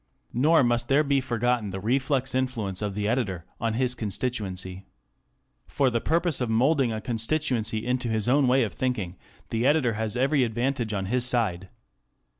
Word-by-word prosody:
Nor 150 +4 +4
must 120 -1 +1
there 140 +3 +4
be 140 -2 +2
forgotten 120 -3 0
the 95 0 -5
reflex 130 +4 0
influence 115 -8 -2
of 100 -2 -3
the 105 0 -1
editor 105 -8 -1
on 115 -1 -1
his 125 0 +1
constituency. 100 -5 -4 0.8
For 135 -3 +1
the 115 -1 0
purpose 165 -3 +1
of 125 - -1
moulding 130 +2 +2
a 110 - -3
constituency 115 -2 -1
into 125 0 -1
his 110 -1 0
own 135 +1 +4
way 130 +1 +4
of 110 - -3
thinking, 110 -9 -2 0.4
the 115 +3 +1
editor 145 -6 +3
has 110 +2 -2
every 135 +2 +2
advantage 120 0 -1
on 100 -2 -2
his 125 +5 0
side. 95 -7 0
120 Hz, 170 wpm, -26 LUFS, 110-130 Hz, 0.8 s, Nor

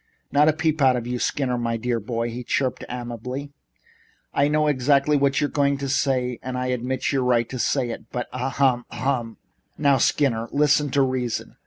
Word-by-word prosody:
"Not 145 +1 +4
a - - +3
peep 160 -1 0
out 130 -2 +5
of 120 -2 -3
you, 125 0 -3
Skinner, 125 -2 -1
my 115 -1 -1
dear 120 0 -1
boy," 115 +2 -3
he 125 +2 -6
chirped 130 +1 -1
amiably. 125 +3 -5 0.8
"I 140 - +3
know 150 +1 +2
exactly 140 +1 +3
what 140 -1 +2
you're 145 - +1
going 140 -1 +1
to 140 0 -4
say 130 -3 0
and 130 0 -4
I 125 0 -2
admit 125 +1 -2
your 135 -2 +1
right 120 -2 +2
to 130 - -5
say 125 -1 0
it, - - -9
but 125 - -3
as 130 +1 -3
ahem! 130 -3 +2
Harumph 125 -4 -2
h - - -27
h! 95 - -46 0.3
now, 140 -2 +4
Skinner, 115 -4 +1
listen 145 0 +3
to 140 +1 +3
reason. 130 -3 -2
130 Hz, 205 wpm, -23 LUFS, 120-140 Hz, 0.8 s, out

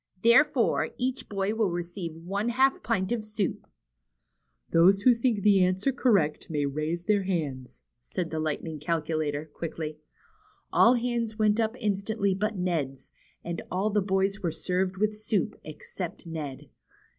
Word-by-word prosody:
Therefore, 235 +2 +4
each 255 +1 -2
boy 200 0 -1
will 220 -3 +1
receive 175 -1 -4
one 195 +7 -2
half 265 +3 +3
pint 215 -3 -1
of 235 -3 -1
soup." 215 -2 -3 1.0
Those 190 +4 +5
who 250 - +7
think 230 -4 0
that 210 - +5
answer 185 +7 +2
correct 200 - +1
may 150 -3 0
raise 155 +4 -2
their 205 +1 +2
hands," 140 - -3 0.2
said 160 - -4
the 160 - -2
Lightning 155 0 -3
Calculator, 155 -1 -1
quickly. 155 0 -6 0.7
All 240 +2 +6
hands 235 -2 -1
went 215 0 +3
up 225 +1 +1
instantly 200 -1 0
but 210 +2 -1
Ned's, 160 -7 -2 0.3
and 170 -1 -4
all 195 +4 0
the 210 0 +2
boys 195 +1 0
were 175 - 0
served 185 +3 -1
with 215 +2 +1
soup 215 0 -1
except 175 +4 -7
Ned. 155 -5 -6
190 Hz, 145 wpm, -28 LUFS, 160-215 Hz, 1.0 s, who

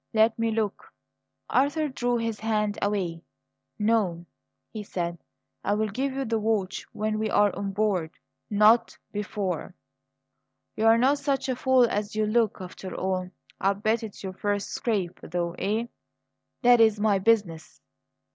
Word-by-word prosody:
Let 220 +1 +4
me 230 0 +1
look!" 215 -2 -2 0.6
Arthur 290 +4 +2
drew 245 -3 -1
his 230 -2 -2
hand 210 -1 0
away. 185 -5 -1 0.6
"No," 210 -6 +1 0.5
he 215 - -5
said. 175 -4 -4 0.4
"I 205 - +1
will 215 0 0
give 265 +7 -2
you 270 0 -2
the 225 -1 0
watch 210 -3 -1
when 215 0 -2
we 220 0 -1
are 205 -1 +3
on 200 0 -3
board; 195 -5 0 0.4
not 215 +3 +4
before." 205 -2 -3 1.0
"You're 225 +1 +5
not 270 +4 +3
such 280 -1 -1
a 255 - +1
fool 260 0 +4
as 210 -2 -2
you 215 0 +1
look, 220 0 +1
after 185 0 -8
all! 185 -1 -2 0.3
I'll 195 +1 +2
bet 220 +3 0
it's 220 -3 -8
your 190 -1 -4
first 205 +1 -2
scrape, 200 -7 -2
though, 170 0 -3
eh?" 215 +4 0 0.8
"That 245 -1 +6
is 220 -2 +4
my 205 -2 +3
business. 190 -6 0
215 Hz, 150 wpm, -26 LUFS, 195-230 Hz, 1.0 s, That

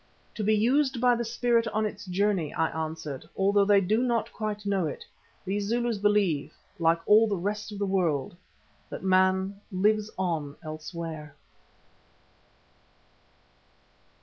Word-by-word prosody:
"To 215 - -4
be 215 +1 +3
used 260 +4 +2
by 245 0 +4
the 235 - -2
spirit 235 0 +1
on 215 0 0
its 205 -1 -6
journey," 185 -4 0
I 160 0 +1
answered. 155 -2 -5
"Although 200 +1 +3
they 200 -1 +5
do 215 +5 +1
not 240 -2 0
quite 210 -1 -4
know 195 -4 +1
it, - - -7 0.4
these 200 +1 -2
Zulus 235 -1 0
believe, 200 -8 +1 0.2
like 165 0 +3
all 220 +2 +6
the 205 - 0
rest 210 +4 -3
of 205 - -7
the 200 - -1
world, 175 -7 0 0.5
that - - -7
man 190 +1 +2
lives 210 +3 +1
on 160 -6 -2
elsewhere." 155 -1 -7
200 Hz, 140 wpm, -27 LUFS, 170-215 Hz, 0.5 s, all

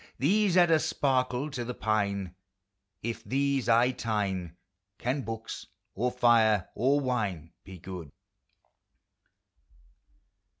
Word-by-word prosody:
These 190 +5 +2
add 175 -2 +6
a 160 - +5
sparkle 130 0 0
to 125 -3 -3
the 125 +1 -5
pine! 100 -4 -1 0.7
If 115 0 -4
these 135 -2 0
I 120 +2 +5
tine 100 -8 -2 0.4
Can 130 +4 -1
books, 115 -2 -6 0.3
or 125 +5 0
fire 115 -5 +3
or 135 +4 +2
wine 105 - -2
be 95 -1 -10
good? 90 -4 -8
120 Hz, 110 wpm, -29 LUFS, 100-130 Hz, 0.7 s, add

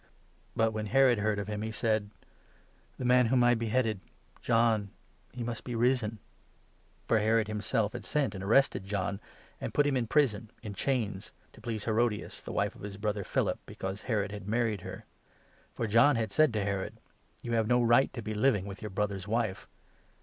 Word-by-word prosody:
" - - -35
But 115 0 +2
when 110 0 -3
Herod 130 0 +5
16 - - -2
heard 105 -1 +1
of 100 -1 -3
him, 105 -1 -3
he 110 - -3
said 110 -1 0 0.4
— - - -34
"The 130 - -4
man 125 -1 +5
whom 125 +1 +3
I 120 0 +5
beheaded— 115 -2 0 0.4
John 115 -3 +2 0.4
he 125 - -5
must 115 -1 -4
be 125 - -4
risen! 120 -2 +1 0.4
" - - -36
For 115 - +3
Herod 110 0 +2
himself 105 0 -1
had 120 -3 -6
sent 135 +2 0
and 95 -1 -6
arrested 110 -1 +3
John, 100 -1 -2 0.4
and - - -5
put 145 - +4
him 145 - +2
17 - - +2
in 115 - -3
prison, 115 -6 +1
in 105 -3 -5
chains, 105 -3 -2 0.2
to - - -16
please 110 -3 -4
Herodias, 110 -1 0
the - - -7
wife - - 0
of - - -15
his 100 -1 -7
brother 105 -1 -2
Philip, - - 0
because 95 +2 -5
Herod 105 -5 -1
had 100 -2 -7
married 110 -2 0
her. - - -8 0.7
For 115 - -1
John 115 +7 +5
had 110 -3 -1
said 155 +6 +4
18 - - -7
to 105 -2 0
Herod 95 -1 -4 0.2
— - - -30
'You 120 - -4
have 115 -2 +2
no 120 +1 +3
right 120 +3 +4
to 120 - -6
be 110 +1 -3
living 105 -3 +2
with 100 0 -8
your 105 - -5
brother's 100 -1 -2
wife.' 110 -3 -1
110 Hz, 210 wpm, -30 LUFS, 105-120 Hz, 0.7 s, Herod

